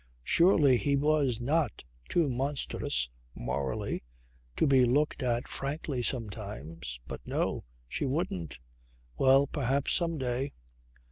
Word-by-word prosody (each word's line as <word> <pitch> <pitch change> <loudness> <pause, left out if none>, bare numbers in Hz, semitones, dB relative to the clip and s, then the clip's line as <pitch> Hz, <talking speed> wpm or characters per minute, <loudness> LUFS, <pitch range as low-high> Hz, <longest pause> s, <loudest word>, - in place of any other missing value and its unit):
Surely 150 - +5
he 140 +3 +1
was 140 -4 +2
not 150 +6 0 0.3
too 170 -3 +2
monstrous 130 - 0 0.3
(morally) 65 +2 -2 0.5
to - - +2
be 135 -3 +5
looked 145 +5 +2
at 120 -1 0
frankly 140 -1 -3
sometimes. 85 - -4
But - - -6
no! - - -1 0.2
She 135 - -2
wouldn't. 90 - -2 0.6
Well, 135 +1 +6
perhaps, 140 -1 0
some 165 -2 0
day 130 +1 -1
130 Hz, 115 wpm, -30 LUFS, 115-145 Hz, 0.6 s, Well